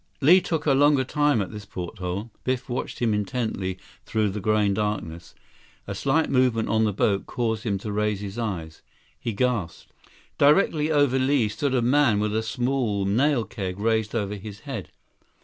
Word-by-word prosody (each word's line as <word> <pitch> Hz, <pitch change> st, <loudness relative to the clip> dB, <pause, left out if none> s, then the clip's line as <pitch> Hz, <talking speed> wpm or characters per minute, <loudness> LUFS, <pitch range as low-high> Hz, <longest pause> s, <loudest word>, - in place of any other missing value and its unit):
89 155 Hz, +6 st, +8 dB
Li 185 Hz, -, +6 dB
took 160 Hz, -3 st, -2 dB
a 145 Hz, -, +4 dB
longer 145 Hz, 0 st, +4 dB
time 145 Hz, -4 st, +1 dB
at 95 Hz, -, -8 dB
this 105 Hz, -1 st, -8 dB
porthole. 95 Hz, +2 st, -5 dB
Biff 130 Hz, 0 st, -2 dB
watched 125 Hz, -1 st, -4 dB
him 115 Hz, -3 st, +1 dB
intently 105 Hz, -3 st, -2 dB, 0.3 s
through 110 Hz, -2 st, 0 dB
the 105 Hz, -, -4 dB
growing 105 Hz, 0 st, +2 dB
darkness. 100 Hz, -5 st, -3 dB, 0.5 s
A 100 Hz, -, -5 dB
slight 140 Hz, +10 st, +1 dB
movement 125 Hz, -4 st, +2 dB
on 110 Hz, 0 st, +3 dB
the 105 Hz, -, +1 dB
boat 100 Hz, 0 st, 0 dB
caused 110 Hz, -2 st, -2 dB
him 100 Hz, -3 st, 0 dB
to 105 Hz, +2 st, -6 dB
raise 105 Hz, -1 st, 0 dB
his 100 Hz, +3 st, -6 dB
eyes. 85 Hz, -8 st, -4 dB, 0.4 s
He 115 Hz, -, -3 dB
gasped. 110 Hz, -6 st, -2 dB, 0.5 s
Directly 150 Hz, +1 st, +4 dB
over 145 Hz, -3 st, +3 dB
Li 130 Hz, -3 st, +2 dB
stood 130 Hz, +5 st, -1 dB
a 120 Hz, -, +2 dB
man 125 Hz, -4 st, +3 dB
with 105 Hz, 0 st, -1 dB
a 110 Hz, -, +1 dB
small 115 Hz, -3 st, -1 dB
nail 125 Hz, +5 st, +2 dB
keg 95 Hz, -4 st, -5 dB
raised 110 Hz, 0 st, 0 dB
over 105 Hz, -3 st, -1 dB
his 105 Hz, 0 st, -8 dB
head. -, -, -6 dB
110 Hz, 180 wpm, -25 LUFS, 100-130 Hz, 0.5 s, 89